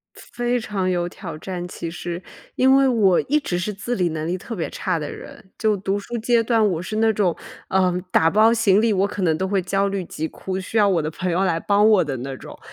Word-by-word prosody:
非 240 Hz, 0 st, -2 dB
常 200 Hz, -5 st, -2 dB
有 175 Hz, -1 st, 0 dB
挑 170 Hz, -3 st, -8 dB
战 175 Hz, +1 st, -5 dB
其 170 Hz, -1 st, -6 dB
实， 175 Hz, +1 st, -6 dB, 0.3 s
因 265 Hz, +1 st, +5 dB
为 275 Hz, 0 st, +4 dB
我 205 Hz, -7 st, +4 dB
一 300 Hz, +3 st, +1 dB
直 235 Hz, -12 st, -3 dB
是 185 Hz, +4 st, -2 dB
自 210 Hz, +5 st, -4 dB
理 180 Hz, -6 st, +1 dB
能 155 Hz, 0 st, -4 dB
力 175 Hz, +2 st, -1 dB
特 230 Hz, -, -7 dB
别 170 Hz, -, -2 dB
差 180 Hz, -3 st, -2 dB
的 150 Hz, -2 st, -5 dB
人， 190 Hz, -, -11 dB
就 215 Hz, -2 st, +2 dB
读 195 Hz, +1 st, -2 dB
书 235 Hz, +4 st, -6 dB
阶 230 Hz, +1 st, +2 dB
段 225 Hz, -1 st, +2 dB
我 170 Hz, -3 st, -2 dB
是 215 Hz, +4 st, -5 dB
那 220 Hz, 0 st, +3 dB
种， 190 Hz, -5 st, +1 dB, 0.3 s
呃， 185 Hz, -1 st, +2 dB, 0.2 s
打 165 Hz, -, +4 dB
包 215 Hz, +4 st, +5 dB
行 220 Hz, -4 st, +3 dB
李， 230 Hz, -1 st, +3 dB
我 195 Hz, 0 st, +2 dB
可 200 Hz, -1 st, -5 dB
能 160 Hz, -3 st, +2 dB
都 190 Hz, -, -1 dB
会 195 Hz, 0 st, +1 dB
焦 195 Hz, +2 st, 0 dB
虑 195 Hz, -2 st, -3 dB
急 160 Hz, -1 st, -4 dB
哭， 190 Hz, +3 st, -5 dB
需 190 Hz, +4 st, -6 dB
要 205 Hz, -1 st, +5 dB
我 175 Hz, -5 st, +2 dB
的 155 Hz, -, -2 dB
朋 180 Hz, +3 st, -3 dB
友 180 Hz, +3 st, +1 dB
来 170 Hz, -3 st, +1 dB
帮 205 Hz, +3 st, +3 dB
我 210 Hz, -5 st, +5 dB
的 140 Hz, -3 st, -3 dB
那 135 Hz, +2 st, -5 dB
种。 -, -, -11 dB
190 Hz, 270 characters per minute, -22 LUFS, 175-215 Hz, 0.3 s, 因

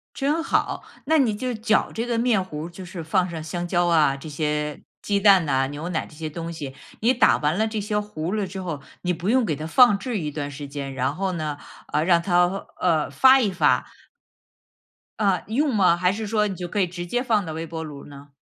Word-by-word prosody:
真 295 Hz, +4 st, 0 dB
好， -, -, 0 dB, 0.2 s
那 320 Hz, +3 st, +3 dB
你 240 Hz, -8 st, +2 dB
就 250 Hz, +4 st, -3 dB
搅 220 Hz, 0 st, +1 dB
这 230 Hz, -, -2 dB
个 240 Hz, -1 st, -1 dB
面 230 Hz, -4 st, +2 dB
糊 155 Hz, -4 st, -6 dB
儿， -, -, -7 dB
就 175 Hz, +2 st, -10 dB
是 175 Hz, -1 st, -7 dB
放 180 Hz, +3 st, +1 dB
上 165 Hz, -2 st, -6 dB
香 175 Hz, +2 st, -4 dB
蕉 175 Hz, 0 st, +2 dB
啊， 155 Hz, -5 st, +4 dB
这 135 Hz, -, -10 dB
些 150 Hz, 0 st, -2 dB, 0.2 s
鸡 200 Hz, -1 st, 0 dB
蛋 195 Hz, -4 st, +6 dB
呐、 135 Hz, -2 st, +1 dB
牛 145 Hz, +5 st, -6 dB
奶 170 Hz, -, -2 dB
这 -, -, -16 dB
些 155 Hz, 0 st, -5 dB
东 165 Hz, +2 st, -6 dB
西。 145 Hz, -5 st, -6 dB, 0.3 s
你 235 Hz, +4 st, +4 dB
打 250 Hz, -, +4 dB
完 150 Hz, +3 st, 0 dB
了 220 Hz, +1 st, +2 dB
这 220 Hz, -1 st, -3 dB
些 210 Hz, +1 st, -1 dB
糊 185 Hz, -4 st, -4 dB
了 210 Hz, -2 st, 0 dB
之 190 Hz, +1 st, -6 dB
后， 165 Hz, -6 st, -5 dB, 0.2 s
你 180 Hz, 0 st, 0 dB
不 175 Hz, +4 st, -3 dB
用 255 Hz, 0 st, +3 dB
给 155 Hz, -, -1 dB
它 155 Hz, -, -6 dB
放 240 Hz, +3 st, +6 dB
置 230 Hz, +3 st, -3 dB
一 150 Hz, -3 st, -3 dB
段 145 Hz, -1 st, -4 dB
时 145 Hz, 0 st, -7 dB
间， 140 Hz, -1 st, -6 dB
然 140 Hz, +2 st, -1 dB
后 195 Hz, 0 st, -1 dB
呢， 155 Hz, -3 st, -3 dB, 0.4 s
呃， 150 Hz, -, +2 dB
让 170 Hz, 0 st, +4 dB
它， 175 Hz, -1 st, +3 dB, 0.3 s
呃， 160 Hz, -5 st, +1 dB
发 260 Hz, -, +6 dB
一 215 Hz, -6 st, +1 dB
发。 185 Hz, -, +2 dB, 1.3 s
呃， 195 Hz, -5 st, +2 dB
用 265 Hz, +4 st, +1 dB
吗？ 185 Hz, -4 st, +4 dB
还 180 Hz, +1 st, +2 dB
是 220 Hz, +2 st, -4 dB
说 210 Hz, 0 st, +1 dB
你 195 Hz, -, -4 dB
就 180 Hz, -, -5 dB
可 205 Hz, -, -2 dB
以 185 Hz, -, +3 dB
直 175 Hz, 0 st, -6 dB
接 245 Hz, +8 st, -1 dB
放 220 Hz, -6 st, +1 dB
到 160 Hz, -, -5 dB
微 160 Hz, +1 st, -5 dB
波 160 Hz, 0 st, -5 dB
炉 145 Hz, -3 st, -9 dB
呢？ 145 Hz, 0 st, -13 dB
180 Hz, 255 characters per minute, -24 LUFS, 155-210 Hz, 1.3 s, 蛋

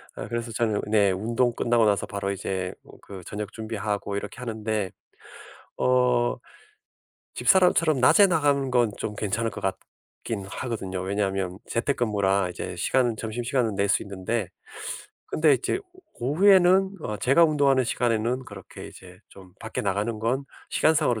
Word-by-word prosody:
아 -, -, -6 dB
그래서 120 Hz, +1 st, -4 dB
저녁 110 Hz, -2 st, 0 dB
네 105 Hz, -2 st, +4 dB
운동 115 Hz, +6 st, 0 dB
끝나고 115 Hz, -1 st, +2 dB
나서 105 Hz, -2 st, +2 dB
바로 100 Hz, -1 st, -3 dB
이제 95 Hz, -1 st, -3 dB
음 -, -, -15 dB
그 95 Hz, -2 st, -10 dB
저녁 105 Hz, 0 st, -5 dB
준비하고 105 Hz, -2 st, -3 dB
이렇게 100 Hz, -, -6 dB
하는데. 110 Hz, -5 st, -3 dB, 0.9 s
어 125 Hz, -1 st, +3 dB, 1.0 s
집사람처럼 170 Hz, -6 st, +3 dB
낮에 200 Hz, -, +7 dB
나가는 145 Hz, -6 st, +1 dB
건 120 Hz, -3 st, +3 dB
좀 105 Hz, -, -4 dB
괜찮을 110 Hz, +3 st, -1 dB
것 -, -, -7 dB
같긴 95 Hz, +1 st, -6 dB
하거든요. 100 Hz, -7 st, -4 dB
왜냐하면 95 Hz, -1 st, -2 dB
재택근무라 105 Hz, -7 st, 0 dB
이제 -, -, -6 dB
시간은 125 Hz, -3 st, +1 dB
점심시간은 115 Hz, 0 st, -1 dB
낼 100 Hz, +1 st, +1 dB
수 -, -, +2 dB
있는데 100 Hz, +2 st, -3 dB, 0.8 s
근데 155 Hz, -1 st, +3 dB
이제 130 Hz, -, -1 dB, 0.4 s
오후에는 190 Hz, +7 st, +4 dB
어 105 Hz, -, -3 dB
제가 135 Hz, -, +5 dB
운동하는 140 Hz, -4 st, +3 dB
시간에는 120 Hz, +2 st, 0 dB
그렇게 100 Hz, -5 st, -10 dB
이제 -, -, -14 dB
좀 95 Hz, -2 st, -15 dB
밖에 -, -, -4 dB
나가는 105 Hz, +3 st, -1 dB
건 120 Hz, +5 st, -1 dB, 0.3 s
시간상으로 145 Hz, -7 st, +2 dB
115 Hz, 325 characters per minute, -25 LUFS, 100-130 Hz, 1.0 s, 낮에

